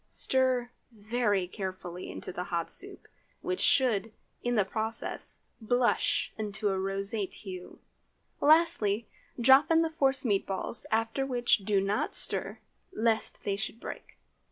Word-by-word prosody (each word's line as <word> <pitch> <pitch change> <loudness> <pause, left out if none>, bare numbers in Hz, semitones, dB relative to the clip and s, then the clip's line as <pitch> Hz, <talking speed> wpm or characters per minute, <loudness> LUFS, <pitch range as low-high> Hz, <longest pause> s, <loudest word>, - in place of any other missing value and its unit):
Stir 255 -2 +1 0.2
very 210 -3 0
carefully 185 -2 -6
into - - -6
the 180 - -4
hot 170 -1 -2
soup, - - -2 0.4
which 365 0 -2
should, 225 -5 +3 0.3
in 245 0 -1
the 210 -3 +3
process, 220 +3 -3 0.2
blush 245 +2 +1
into 210 0 -1
a 190 -1 -1
roseate 195 +1 -1
hue. 185 -3 -9 0.6
Lastly, 285 -10 +3 0.3
drop 265 +4 +6
in 330 0 +4
the 325 - -2
force 270 -4 +1
meat 200 -4 +1
balls, 195 +3 -3
after 225 +4 0
which 245 -3 +2
do 200 0 +1
not 195 +2 0
stir, - - 0 0.3
lest 225 -8 +1
they 200 - -1
should 220 +2 -5
break. - - -9
220 Hz, 135 wpm, -29 LUFS, 195-250 Hz, 0.6 s, drop